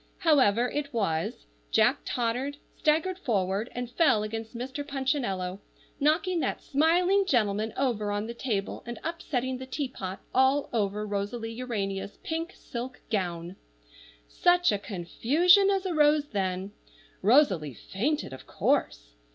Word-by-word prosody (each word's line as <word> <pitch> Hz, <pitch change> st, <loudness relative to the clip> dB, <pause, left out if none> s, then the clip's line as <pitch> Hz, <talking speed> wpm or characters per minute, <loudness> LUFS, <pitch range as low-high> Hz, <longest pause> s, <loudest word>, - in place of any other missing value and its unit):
However 255 Hz, -, +4 dB
it 290 Hz, +2 st, -3 dB
was, 165 Hz, -, -1 dB, 0.2 s
Jack -, -, +3 dB
tottered, 250 Hz, +4 st, -1 dB, 0.2 s
staggered 325 Hz, +5 st, +1 dB
forward, 200 Hz, -, 0 dB
and 245 Hz, 0 st, -3 dB
fell 245 Hz, -4 st, +3 dB
against 225 Hz, +2 st, -5 dB
Mr. 260 Hz, +4 st, -4 dB
Punchinello, 260 Hz, -, -2 dB, 0.4 s
knocking 330 Hz, +5 st, +2 dB
that -, -, -1 dB
smiling 355 Hz, +7 st, +3 dB
gentleman 215 Hz, -, +1 dB
over 225 Hz, -6 st, 0 dB
on 205 Hz, +1 st, -1 dB
the 235 Hz, -, -5 dB
table, 220 Hz, -5 st, -3 dB
and 240 Hz, -, -5 dB
upsetting 260 Hz, -6 st, -2 dB
the 260 Hz, -, -7 dB
teapot 250 Hz, -9 st, -4 dB
all 265 Hz, +2 st, +3 dB
over 210 Hz, -1 st, 0 dB
Rosalie 210 Hz, +3 st, -3 dB
Urania's 205 Hz, -5 st, -3 dB
pink 330 Hz, +2 st, -3 dB
silk 250 Hz, 0 st, -7 dB
gown. 175 Hz, -3 st, -2 dB, 0.7 s
Such 355 Hz, -, +3 dB
a 205 Hz, -, 0 dB
confusion 280 Hz, -, +3 dB
as 390 Hz, -1 st, +1 dB
arose 300 Hz, -4 st, +3 dB
then! 190 Hz, -1 st, -2 dB, 0.5 s
Rosalie 190 Hz, -, +4 dB
fainted, 225 Hz, -, -2 dB
of 130 Hz, -, -11 dB
course. -, -, 0 dB
240 Hz, 125 wpm, -28 LUFS, 200-295 Hz, 0.7 s, However